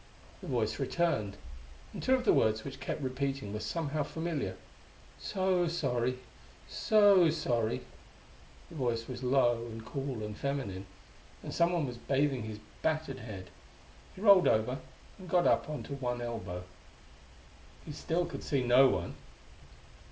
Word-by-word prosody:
The - - -8
Voice - - 0
returned, 110 - 0 0.6
and - - -6
two 260 - +4
of 255 -1 -2
the - - +6
words 110 0 +2
which 135 -1 -7
kept 140 +2 -4
repeating 135 -4 -2
were 105 - -3
somehow 155 +4 -2
familiar. 145 - -3 0.6
"So 185 - +1
sorry... 125 -6 0 0.5
so 205 -5 +5
sorry...." 120 -8 0 0.9
The 165 - -10
Voice 120 -4 -1
was 130 -1 -6
low 125 -3 +3
and 110 -1 -8
cool 130 -2 -4
and 105 0 -5
feminine. 105 -9 -3 0.6
And - - -6
someone 170 -2 +2
was 120 -2 -6
bathing 135 0 +1
his 110 -1 -6 0.2
battered 155 -3 -1
head.... 100 -5 -8 0.6
He 185 - -10
rolled 200 -4 +7
over 120 +5 +2 0.4
and 185 -2 -10
got 175 0 +3
up - - +3
on 150 - -4
one 125 -3 -3
elbow. 100 -7 -4 1.2
He - - -6
still 165 +4 -1
could 170 - -7
see 140 -4 0
no 125 +2 +7
one. - - -2
135 Hz, 145 wpm, -32 LUFS, 115-160 Hz, 1.2 s, rolled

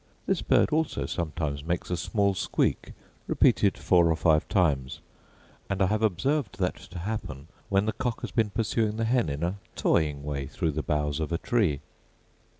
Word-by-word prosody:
This - - 0
bird - - +3
also 155 - 0
sometimes 75 -2 -3
makes 85 +2 -2
a - - +2
small 100 +3 +1
squeak, 95 - -1 0.3
repeated - - +3
four 85 -2 +4
or 80 - +3
five 80 0 +2
times; 70 -9 +1 0.7
and 95 - -1
I 95 - +4
have 105 +3 0
observed 110 - 0
that 90 -2 0
to 90 - -11
happen 85 - -5 0.2
when 100 +1 +2
the 110 - 0
cock 125 -3 -3
has - - -5
been 110 -3 +1
pursuing 110 0 0
the 115 - 0
hen 120 - +2
in 70 +3 -3
a 90 +4 -2 0.2
toying 75 -3 +1
way 70 -2 -3
through 80 - -1
the 75 +1 -2
boughs 75 +1 -1
of 80 0 -3
a 85 - +1
tree. 90 - +1
90 Hz, 180 wpm, -27 LUFS, 75-105 Hz, 0.7 s, four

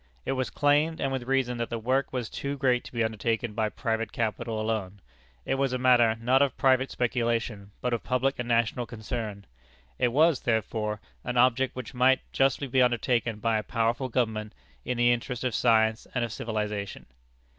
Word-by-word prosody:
It - - -1
was 130 -1 -1
claimed, 150 +2 +2
and 135 - -1
with 130 -2 -3
reason, 130 -2 +1
that 115 - -2
the 115 - -2
work 130 +4 0
was 125 -3 -3
too 140 +4 -4
great 125 -3 +2
to - - -10
be 115 -2 0
undertaken 110 +1 -1
by 110 0 0
private 115 -1 -2
capital 110 0 -2
alone. 110 -3 -2 0.5
It - - 0
was 135 -2 +1
a - - +1
matter, 120 -3 +4
not 125 +4 +3
of 140 -2 +1
private 130 0 +3
speculation, 115 -4 -1
but 125 -1 -1
of 115 - -1
public 130 +2 0
and 125 - -3
national 115 +1 +1
concern. 110 -3 -5 0.5
It 125 - +3
was, 150 +4 +3
therefore, 110 -2 -1 0.2
an 125 - -3
object 130 +1 +3
which 125 -1 -7
might 130 +1 +4
justly 135 +1 +2
be 130 0 +2
undertaken 120 -2 +1
by 110 0 +1
a - - -2
powerful 115 +4 -1
government, 110 -3 -1 0.3
in 125 - -2
the 120 0 +4
interest 120 +1 -4
of 125 -2 -1
science 110 -2 +2
and 125 -1 +1
of 115 - -7
civilization. 105 -3 -4
120 Hz, 190 wpm, -27 LUFS, 110-130 Hz, 0.5 s, matter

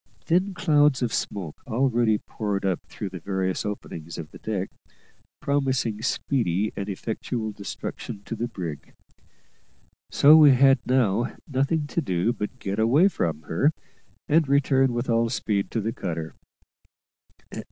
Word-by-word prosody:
Thin 185 +3 +1
clouds 150 -6 +3
of 115 - -1
smoke 90 -7 -4
already 120 -3 +2
poured 105 -2 -3
up 95 -3 +1
through 100 - -6
the 90 -1 -8
various 95 +1 -2
openings 85 -5 -6
of 80 -2 -7
the - - -12
deck, 100 -3 -3 0.7
promising 130 -6 0
speedy 110 -6 0
and 100 0 -4
effectual 110 +2 -3
destruction 100 +1 -7
to 115 - -4
the 120 +1 -2
brig; 85 -10 -7 1.1
so 150 +2 +7
we 150 -3 +8
had 135 +1 +5
now 120 -3 +1
nothing 145 +3 0
to 170 - -2
do 95 - 0
but 105 +4 -5
get 100 -2 -3
away 135 - +5
from 80 - -2
her, 135 - +1 0.5
and 155 0 +3
return 135 -1 +3
with 120 +2 -2
all 115 0 +2
speed 105 -4 -1
to 115 - -2
the 110 +2 -2
cutter. 80 -4 -4
115 Hz, 140 wpm, -25 LUFS, 100-135 Hz, 1.1 s, we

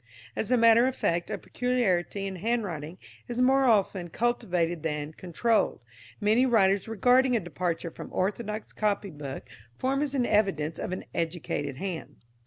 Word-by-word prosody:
As 220 - -2
a 250 - +4
matter 230 +1 +6
of 260 - -2
fact 170 0 0
a - - -2
peculiarity 205 -6 0
in 190 -1 -4
handwriting 180 -7 -2 0.3
is 240 0 -4
more 265 +2 +4
often 195 -6 +2
cultivated 175 -7 0
than 150 -1 -3
controlled, 200 +7 0 0.4
many 215 +4 +3
writers 200 -6 +3
regarding 245 +4 +3
a - - +3
departure 175 -2 -3
from - - -9
orthodox 210 +3 -2
copybook 170 -12 -3 0.3
form 270 +2 0
as 285 -2 -1
an 250 -3 +2
evidence 185 -9 +1
of - - -4
an 185 - -4
"educated 160 -4 -3
hand." 185 -1 -5
200 Hz, 150 wpm, -28 LUFS, 170-240 Hz, 0.4 s, matter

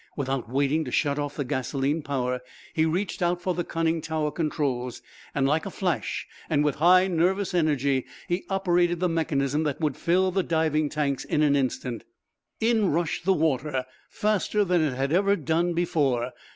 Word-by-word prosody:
Without 135 -4 -2
waiting 140 +4 +1
to 135 - -6
shut 145 +1 +1
off 145 0 -3
the 145 - -2
gasoline 135 +3 -1
power, 125 -3 -2 0.3
he 160 0 +2
reached 180 +5 -2
out 175 0 +1
for 180 +1 -1
the 175 0 -2
conning 165 -1 -1
tower 155 -1 -1
controls. 140 -7 -2 0.3
Like 145 +5 +1
a - - -3
flash, 180 -2 -2 0.2
and 150 -2 +2
with 150 -2 0
high 180 +2 +6
nervous 185 +3 +1
energy, 140 -6 +1 0.2
he 175 +2 -1
operated 175 -3 +2
the 180 - +2
mechanism 155 -4 0
that 145 -3 -2
would 150 -5 0
fill 185 +2 +2
the 190 +1 +1
diving 160 -3 +1
tanks 140 -3 -1
in 150 - +1
an 145 -1 +4
instant. 130 -3 -2 0.6
In 220 -3 +2
rushed 165 +2 -1
the 190 - +4
water, 150 -5 0 0.2
faster 210 -1 +1
than 180 -2 +2
it 145 -5 0
had 135 +3 -1
ever 200 +2 +3
done 170 +1 0
before. 135 -8 +1
155 Hz, 175 wpm, -26 LUFS, 140-175 Hz, 0.6 s, high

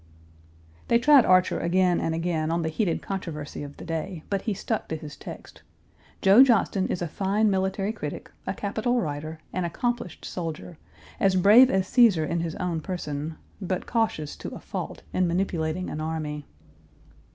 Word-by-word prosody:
They 235 - +5
tried 275 +1 +6
Archer 185 0 +4
again 180 +1 +2
and 160 - -1
again 165 -2 -1
on 165 0 0
the 160 - -1
heated 170 0 -1
controversy 165 -7 -5
of 145 0 -8
the - - -9
day, 165 +1 -4
but 200 -1 0
he 220 - -1
stuck 220 +3 -3
to 160 - -3
his 155 -2 -8
text. - - -10 0.6
Joe 200 +7 +8
Johnston 215 -6 +2
is 175 - -2
a - - -2
fine 200 +6 +1
military 190 +2 0
critic, 150 -10 -6 0.2
a - - 0
capital 220 +4 0
writer, 155 -2 -4 0.2
an 185 - -1
accomplished 210 +1 -3
soldier, 165 -1 -6 0.4
as 195 -1 +3
brave 215 +8 +7
as 190 -3 +1
Cæsar 210 -11 +4
in 170 - -1
his 165 -1 -3
own 170 -3 -2
person, 155 -3 -4 0.3
but 185 -1 -2
cautious 220 -11 -1
to - - -6
a - - -8
fault - - -6
in 185 -1 +2
manipulating 175 -1 -1
an 155 - -4
army. 155 -2 -4
180 Hz, 170 wpm, -26 LUFS, 160-200 Hz, 0.6 s, Joe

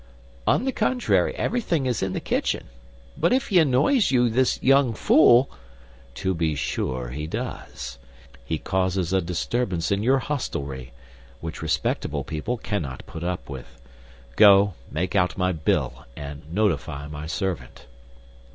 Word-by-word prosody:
"On 245 - +3
the 265 - +1
contrary, 250 +1 +1
everything 175 - 0
is 125 -4 0
in 95 -1 -1
the - - -2
kitchen. - - -1 0.5
But - - +2
if 260 0 +1
he 190 -4 +5
annoys 155 - +3
you, 125 -2 +3
this 130 +3 +2
young 135 -3 +4
fool—" 130 -3 +6 0.7
"To 95 -1 -1
be 80 -3 0
sure 65 -3 -2
he 75 +5 -5
does. 70 - -6 0.4
He 80 - -2
causes 95 0 -1
a 95 - +3
disturbance 90 +1 -1
in 100 0 +1
your 130 +5 +3
hostelry, 70 - -4 0.5
which 80 -1 -6
respectable 80 0 -1
people 80 +11 -3
cannot 80 - -4
put 80 0 -8
up 90 +1 -3
with. 65 -3 -9 0.6
Go; 100 +1 +7 0.2
make 90 +6 -2
out 90 -4 +2
my 90 0 +1
bill 80 -3 -1
and 75 +1 -8
notify 80 -7 0
my 75 +1 -7
servant." 85 -7 -4
95 Hz, 140 wpm, -24 LUFS, 75-125 Hz, 0.7 s, Go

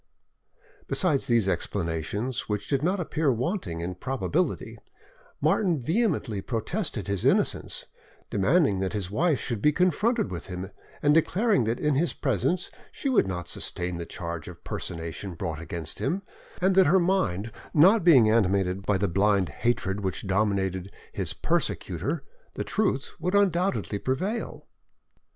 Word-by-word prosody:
Besides 155 -8 +2
these 115 -5 +3
explanations, 100 +7 -2
which 105 0 -2
did 140 -2 +1
not 185 +4 +1
appear 160 -4 +1
wanting 120 - -2
in 90 +2 -3
probability, 135 - -2 0.6
Martin 180 -7 +2
vehemently 150 - 0
protested 115 - -2
his 100 -2 -1
innocence, - - +1 0.5
demanding 105 - +3
that 95 -1 -2
his 100 -3 -3
wife 155 +6 +2
should 115 -5 -3
be 150 - +5
confronted 185 - +1
with 85 - -6
him, 95 +1 -6 0.3
and 145 0 +5
declaring 180 - +3
that 115 +2 -1
in 150 -1 +1
his 160 +6 +1
presence 145 - 0 0.2
she 275 - -3
would 245 - +3
not 90 -2 -4
sustain 90 0 -2
the 85 - -5
charge 85 -3 -5
of - - -11
personation 85 +2 -5
brought 80 -1 -4
against 85 -2 -5
him, 180 +9 -1 0.4
and 190 +1 +4
that 190 -2 +6
her 190 +5 +5
mind 170 - 0 0.2
not 190 +7 +6
being 135 -10 +7
animated 95 -3 +2
by 100 -1 +1
the 100 +2 +1
blind 100 0 +2
hatred 95 +2 -1
which 95 0 -3
dominated 95 -1 0 0.2
his - - -2
persecutor, 95 - -1 0.3
the - - -2
truth 190 -11 0
would 180 +4 -1
undoubtedly 185 - +1
prevail. 185 - -2
115 Hz, 145 wpm, -27 LUFS, -, 0.6 s, being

